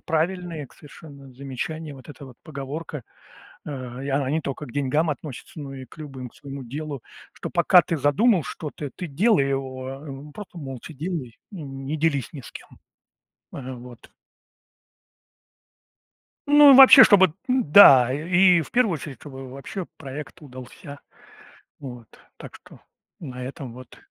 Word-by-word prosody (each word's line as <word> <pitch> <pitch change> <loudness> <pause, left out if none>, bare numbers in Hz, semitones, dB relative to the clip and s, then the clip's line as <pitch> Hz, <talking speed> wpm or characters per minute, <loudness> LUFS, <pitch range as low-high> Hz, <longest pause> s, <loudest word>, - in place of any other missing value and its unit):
правильное 165 -2 -2
к - - -23
совершенно 140 -3 -14
замечание. 140 +4 -6
Вот 130 +1 -15
эта 145 -1 -11
вот 125 -2 -14
поговорка, 150 -1 -7 0.6
а, 130 -3 -7
и 135 - -6
она 135 -1 0
не 160 +1 0
тока 140 +2 -5
к 120 - -12
деньгам 145 +3 0
относится, 150 +1 -7
но 140 -2 -7
и 130 -1 -9
к 125 - -18
любым, 135 -5 -8
к - - -27
своему 140 -1 -9
делу. 140 +1 -6 0.3
Что - - -7
пока 180 - +5
ты 165 - -3
задумал 175 - +2
что-то, 150 -2 -7
ты 180 - -6
делай 160 -1 +2
его, 130 -1 -4
а, 135 +1 -7
ну 140 +1 -9
просто 205 -1 -11
молча 135 0 -8
делай 150 -6 -5
и 190 -5 -8
не 135 +1 -6
делись 145 -5 0
ни 140 - -8
с - - -13
кем. - - -11 0.9
Ага, 130 -1 -7
вот. 120 -1 -13 2.4
Ну 290 0 +8
и - - +8
вообще, 265 0 +10
чтобы, 190 -6 +5
н-да, 150 - +7
э 150 +5 -4
и 180 -1 +5
в 150 - -10
первую 240 -6 +2
очередь, 140 -3 -8
чтобы 135 -2 -10
вообще 140 +8 -7
проект 145 +4 -9
удался 135 +1 -11 0.8
вот. 120 -4 -10 0.3
Так - - -11
что - - -17 0.4
на 125 -5 -8
этом 130 -2 -8
вот. 130 -1 -13
145 Hz, 160 wpm, -23 LUFS, 130-165 Hz, 2.4 s, вообще